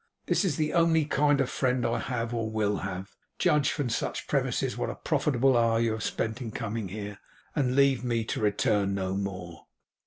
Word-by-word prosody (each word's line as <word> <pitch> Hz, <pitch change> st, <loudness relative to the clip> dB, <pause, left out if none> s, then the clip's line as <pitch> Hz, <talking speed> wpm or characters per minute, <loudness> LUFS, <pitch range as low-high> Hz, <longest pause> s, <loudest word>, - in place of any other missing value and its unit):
This -, -, +2 dB
is 180 Hz, -7 st, +1 dB
the 155 Hz, -1 st, 0 dB
only 165 Hz, -2 st, +4 dB
kind 145 Hz, -1 st, +2 dB
of 135 Hz, -, +2 dB
friend 125 Hz, -2 st, 0 dB
I 115 Hz, -, 0 dB
have 120 Hz, -2 st, -3 dB
or 115 Hz, -2 st, -1 dB
will 105 Hz, -2 st, 0 dB
have. 95 Hz, 0 st, -6 dB, 0.2 s
Judge 150 Hz, -2 st, +3 dB
from 145 Hz, -4 st, -1 dB
such 115 Hz, -, -2 dB
premises -, -, 0 dB
what -, -, -2 dB
a -, -, -4 dB
profitable 135 Hz, -2 st, +2 dB
hour 115 Hz, -1 st, +3 dB
you 115 Hz, -1 st, +2 dB
have 110 Hz, 0 st, -3 dB
spent 115 Hz, +3 st, -2 dB
in 120 Hz, -, -4 dB
coming 110 Hz, -1 st, -4 dB
here, 100 Hz, +1 st, -6 dB, 0.4 s
and 130 Hz, -4 st, +1 dB
leave 140 Hz, -3 st, +4 dB
me, 120 Hz, -2 st, 0 dB
to 110 Hz, -, -3 dB
return 100 Hz, -1 st, +1 dB
no 95 Hz, -1 st, -2 dB
more. 95 Hz, -5 st, -5 dB
115 Hz, 195 wpm, -28 LUFS, 105-135 Hz, 0.4 s, only